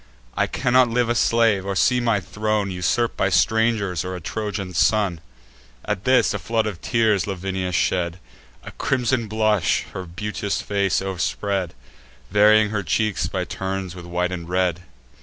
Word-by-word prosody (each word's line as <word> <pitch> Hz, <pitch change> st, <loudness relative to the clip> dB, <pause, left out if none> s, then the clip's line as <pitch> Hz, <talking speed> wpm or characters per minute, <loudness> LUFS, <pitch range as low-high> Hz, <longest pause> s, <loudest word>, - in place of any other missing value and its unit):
I -, -, +1 dB
cannot 125 Hz, 0 st, +3 dB
live 120 Hz, 0 st, +1 dB
a -, -, +3 dB
slave, 115 Hz, -3 st, +2 dB
or 100 Hz, 0 st, -3 dB
see 125 Hz, +6 st, +3 dB
my 115 Hz, -4 st, +1 dB
throne 105 Hz, 0 st, -2 dB
Usurp'd 95 Hz, +6 st, 0 dB
by -, -, +1 dB
strangers 110 Hz, -7 st, +1 dB
or 95 Hz, 0 st, -4 dB
a -, -, -5 dB
Trojan 100 Hz, +1 st, -4 dB
son." 95 Hz, -2 st, +2 dB, 0.6 s
At 95 Hz, -, -3 dB
this, 130 Hz, 0 st, +4 dB
a -, -, -3 dB
flood 115 Hz, -1 st, 0 dB
of 100 Hz, -5 st, -5 dB
tears 110 Hz, -6 st, +1 dB
Lavinia 95 Hz, -1 st, -3 dB
shed; 85 Hz, 0 st, 0 dB, 0.5 s
A -, -, -9 dB
crimson 125 Hz, -3 st, 0 dB
blush 110 Hz, -6 st, +1 dB
her 95 Hz, -, -5 dB
beauteous 100 Hz, +3 st, -3 dB
face 100 Hz, -2 st, 0 dB
o'erspread, 95 Hz, -1 st, -2 dB, 0.6 s
Varying 105 Hz, +1 st, +5 dB
her 105 Hz, -2 st, -1 dB
cheeks 105 Hz, +2 st, 0 dB
by -, -, -3 dB
turns 95 Hz, -2 st, -4 dB
with 90 Hz, -1 st, -10 dB
white 90 Hz, +1 st, -1 dB
and 85 Hz, -2 st, -6 dB
red. 90 Hz, -1 st, 0 dB
100 Hz, 160 wpm, -22 LUFS, 90-110 Hz, 0.6 s, Varying